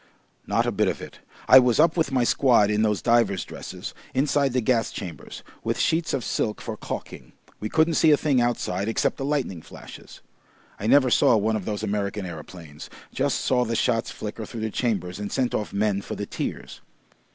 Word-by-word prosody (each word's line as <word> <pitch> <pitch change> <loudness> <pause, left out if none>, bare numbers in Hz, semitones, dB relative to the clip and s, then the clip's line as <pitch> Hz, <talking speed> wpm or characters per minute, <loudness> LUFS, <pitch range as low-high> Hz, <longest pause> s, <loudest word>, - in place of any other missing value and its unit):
"Not - - +1
a - - 0
bit - - +1
of - - -1
it. - - -10 0.3
I 130 - +10
was 125 -1 +2
up 165 +1 +4
with 160 -5 0
my 130 -2 +2
squad 120 -4 +3
in 105 0 +1
those 105 -2 0
divers' 115 -5 +2
dresses, - - -8 0.2
inside 140 0 +2
the 125 - +1
gas 115 -1 +1
chambers, 90 -6 -8 0.2
with - - -1
sheets 165 0 +1
of 135 -4 -1
silk 105 - -1
for - - -5
caulking. - - -7 0.3
We 105 - -4
couldn't 160 +1 +2
see 160 +1 +4
a 150 - +6
thing 140 -5 +2
outside 105 -5 -1
except 115 - 0
the 135 - -4
lightning 135 - -2
flashes. - - -13 0.6
I 105 - -3
never 130 0 +5
saw 115 - +5
one 110 +2 +1
of 105 -4 -4
those 105 -1 -3
American 100 -1 -2
aeroplanes. 80 -2 -10 0.2
Just - - 0
saw 125 -1 +2
the 115 -1 -2
shots 115 0 +1
flicker 110 +1 -6
through 115 - -7
the 110 0 -2
chambers 100 -7 -2
and 105 -1 -5
sent 130 -2 0
off 105 - -2
men 100 -1 0
for - - -6
the - - -4
tears. - - -6
115 Hz, 200 wpm, -24 LUFS, 105-130 Hz, 0.6 s, I